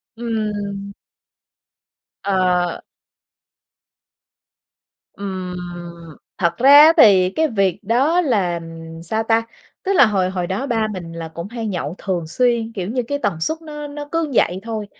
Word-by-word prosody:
Ừm. 210 -3 -3 1.3
Ờ. 180 -3 +1 2.4
Ừm, 185 -2 -5 0.8
thật 170 -2 0
ra 270 +3 +6
á, 320 - +6
thì 185 -3 +6
cái 315 +11 +1
việc 195 - 0
đó 270 - +2
là 195 - 0 0.4
sao 220 +6 -1
ta? 225 0 +2 0.4
Tức 395 0 0
là 280 - +7
hồi 195 -4 +1
hồi 180 -2 -3
đó 195 +9 -2
ba 225 -3 0
mình 170 -3 -7
là 165 -1 -6
cũng 170 +3 -7
hay 230 0 -5
nhậu 175 -5 -3
thường 175 -4 -3
xuyên, 235 +4 +1
kiểu 190 -4 -4
như 250 +2 -1
cái 285 - -1
tần 175 - -1
suất 315 - 0
nó 295 -2 -7
nó 290 0 -7
cứ 330 -3 -1
vậy 180 -5 +2
thôi. 220 -2 -4
205 Hz, 145 wpm, -20 LUFS, 185-245 Hz, 2.4 s, là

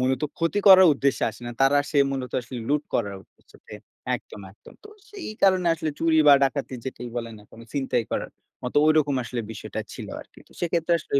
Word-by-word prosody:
মূলত 130 +1 0 0.2
ক্ষতি 165 +4 0
করার 190 -1 +9
উদ্দেশ্যে 140 0 0
আসে 110 - -15
না। - - -4
তারা 135 +1 +4
আসে 145 +1 -5
মূলত 130 -2 -4
আসলে 125 +1 -8
লুট 145 +1 +1
করার 100 -4 -1
উদ্দেশ্যেতে - - -21 0.4
একদম, - - -9
একদম। 105 - -18
তো - - -12 0.2
সেই 400 -5 -8
কারণে 185 -2 +4
আসলে 160 -1 -3
চুরি 165 -1 +2
বা - - +10
ডাকাতি 135 0 -2
যেটাই 125 -2 -6
বলেন 115 -1 -5
না 105 - -16
কেন? 115 - -14
ছিনতাই 135 -4 -1
করার - - -3 0.3
মতো 125 - -5
ঐরকম 155 -2 +3
আসলে 120 0 -4
বিষয়টা 110 - -6
ছিল - - -8
আরকি। - - -17
তো - - -21
সেক্ষেত্রে 170 0 0
আসলে 150 - -8
140 Hz, 200 wpm, -24 LUFS, 125-165 Hz, 0.4 s, বা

